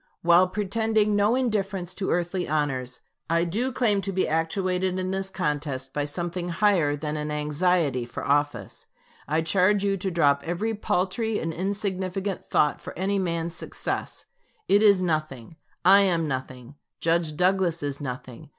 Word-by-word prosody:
While 175 +2 +6
pretending 210 +2 +1
no 205 +3 +3
indifference 195 -7 -1
to 190 - -3
earthly 175 +1 -1
honors, 135 -5 -2 0.3
I 170 +1 +2
do 220 +10 -1
claim 220 -5 +1
to 195 - -3
be 190 0 0
actuated 180 +3 0
in 185 0 -2
this 190 0 -2
contest 145 -7 -3
by 145 -1 -1
something 175 +3 -3
higher 175 -5 +2
than 150 +1 -4
an 150 0 -3
anxiety 150 -2 +1
for 120 - -7
office. 145 +1 -1 0.4
I 155 +2 +1
charge 190 +4 +3
you 200 -1 +1
to 190 +1 -2
drop 145 -5 +3
every 175 +7 -2
paltry 210 +2 -1
and 165 0 -3
insignificant 195 0 -2
thought 150 - +1
for - - -9
any 195 +2 0
man's 170 -2 -2
success. - - -5 0.4
It 200 +1 +5
is 200 -4 +5
nothing; 155 -4 -3 0.3
I 195 +2 +8
am 175 -5 +2
nothing; 130 0 -6 0.2
Judge 165 -2 0
Douglas 180 -2 +1
is 145 0 -3
nothing. 125 -2 -7
175 Hz, 155 wpm, -25 LUFS, 150-195 Hz, 0.4 s, I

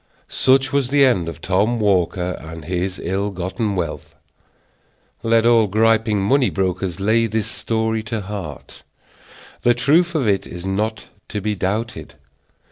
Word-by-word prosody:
Such 135 +1 +2
was 140 -3 +2
the 140 0 +5
end 95 -10 +1
of 85 0 -9
Tom 105 +6 +1
Walker 90 -3 +1
and 80 0 -9
his 90 +2 -2
ill 95 +4 -1
gotten 95 +3 -3
wealth. 90 -2 -4 1.1
Let 115 0 +2
all 115 -2 +5
gripping 110 0 +2
money 130 +5 +3
brokers 95 -1 -2
lay 110 +3 +2
this 110 -1 -1
story 110 0 -1
to 110 0 -3
heart. 95 -8 -8 0.8
The 120 0 +3
truth 165 +7 +2
of 135 -7 +1
it 100 -2 +1
is 90 +1 -8
not 105 +3 -2 0.2
to 105 - -3
be 105 +1 -1
doubted. 105 +4 -3
105 Hz, 145 wpm, -20 LUFS, 95-115 Hz, 1.1 s, the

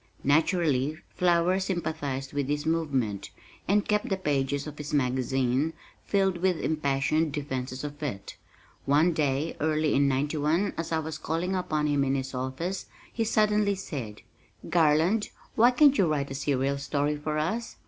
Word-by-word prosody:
Naturally 150 -1 +2
Flower 175 +1 +2
sympathized 155 -8 -3
with 140 -2 -1
this 145 +1 -1
movement, 135 -11 -1 0.4
and 205 +1 +2
kept 210 0 +1
the 195 - 0
pages 140 -4 -1
of 150 -1 -8
his 150 0 -3
magazine 130 +2 +1 0.3
filled 195 -2 +1
with 180 -1 +1
impassioned 155 +1 0
defenses 130 -3 -4
of 145 0 -7
it. 125 -10 -5 0.5
One 155 +5 +3
day, 150 0 0
early 155 -1 +1
in 140 +1 +3
'91, 150 +7 0
as 165 0 -4
I 160 - +2
was 160 0 -4
calling 170 +4 -2
upon 155 -5 -1
him 145 -2 +2
in 135 0 +1
his 130 0 -3
office, 130 +9 -3 0.3
he 230 - 0
suddenly 210 -2 +2
said, 130 - -6 0.5
"Garland, 170 +6 +3 0.2
why 235 +2 +6
can't 280 +2 +5
you 190 - +3
write 140 -3 -1
a - - -3
serial 140 0 0
story 145 +1 0
for 150 +1 -3
us? 215 +10 -2
150 Hz, 155 wpm, -27 LUFS, 140-175 Hz, 0.5 s, why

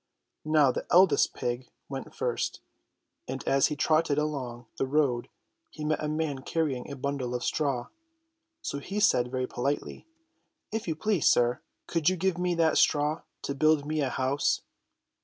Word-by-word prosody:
Now 155 -3 +4
the - - -5
eldest 175 -5 +5
pig 120 +1 -3 0.2
went 135 -1 -7
first, 120 -1 -2 0.7
and 130 +1 -5
as 135 0 +4
he 150 - -3
trotted 155 -1 +2
along 130 -6 -3
the 135 - 0
road 135 -4 +1 0.4
he 150 - -7
met 155 0 0
a - - 0
man 155 -2 -1
carrying 140 -4 -2
a 140 - -5
bundle 135 -2 -2
of 125 - -3
straw. 140 -5 -1 0.7
So 140 - -3
he 195 +8 -4
said 125 -11 +3
very 130 0 -1
politely: 140 - -3 0.6
"If 220 -2 -3
you 160 - -1
please, 180 +1 +1
sir, 120 0 +3 0.2
could 165 -1 +2
you 185 - -1
give 180 0 0
me 180 -1 +1
that 165 -2 +3
straw 150 +2 +2 0.2
to 140 - -2
build 155 +1 +3
me 155 0 -1
a 135 - +1
house 130 +3 +1
145 Hz, 165 wpm, -28 LUFS, 130-155 Hz, 0.7 s, eldest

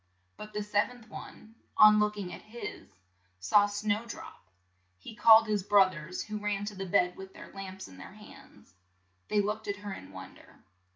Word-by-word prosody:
But 210 0 -10
the 210 0 -2
sev 205 0 +1
enth 245 -3 -15
one, 220 - -11 0.2
on 215 0 +8
look 210 0 +1
ing 190 -3 -5
at - - -9
his, 235 +3 -8 0.5
saw 205 - +4
Snow 205 +1 -1
drop. 160 - -10 0.5
He 215 - -11
called 225 -1 +7
his 210 -2 0
broth 195 -1 +4
ers, 170 +2 -6
who 215 0 -5
ran 205 -1 -2
to 205 0 -6
the 190 0 -5
bed 180 -1 +2
with 190 0 -11
their - - -12
lamps 190 -1 -8
in 90 - -14
their 90 - -11
hands. - - -16 0.5
They 210 -1 +2
looked 210 +2 -3
at 200 - -1
her 200 - -4
in 95 - -11
won 95 -1 -10
der. - - -19
205 Hz, 195 wpm, -30 LUFS, 190-215 Hz, 0.5 s, on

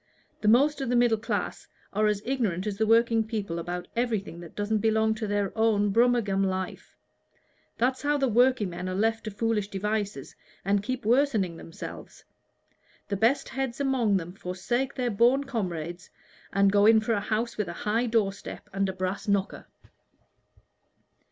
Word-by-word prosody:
The 210 - -1
most 280 +7 +4
of 265 - -2
the 245 - +1
middle 240 -2 +3
class 220 - -3 0.3
are 215 +1 +2
as 210 -1 0
ignorant 220 -8 -1
as 210 -2 -2
the 220 - +2
working 230 0 +4
people 210 -6 -4
about 175 +1 -5
everything 220 -7 -2
that 170 -2 -11
doesn't 210 +1 0
belong 220 +1 +2
to 220 0 -4
their 205 -1 -1
own 215 -2 +2
Brummagem 230 -4 +3
life. 185 -1 -4 0.8
That's 255 +2 +1
how 295 0 +1
the 275 -1 +1
workingmen 210 -7 +2
are 185 - -3
left 225 +3 0
to - - -2
foolish 210 0 -1
devices 205 -6 -3 0.3
and 200 0 +2
keep 255 +2 -4
worsening 225 -8 +2
themselves: 165 - -9 0.9
the 200 - 0
best 240 +7 +2
heads 265 -1 -3
among 255 -7 +2
them 175 -1 -6
forsake 195 +8 -2
their 250 -2 -1
boon 240 +6 +3
comrades, 175 - -4 0.4
and 200 0 +3
go 205 +1 +5
in 225 0 +7
for 220 +1 0
a 205 - +1
house 220 +3 -2
with 210 -3 -2
a 170 - -5
high 225 +4 +1
door 220 -4 +2
step 195 - -10
and 195 0 0
a - - -3
brass 185 +2 -3
knocker." 200 -1 -1
215 Hz, 170 wpm, -27 LUFS, 195-235 Hz, 0.9 s, in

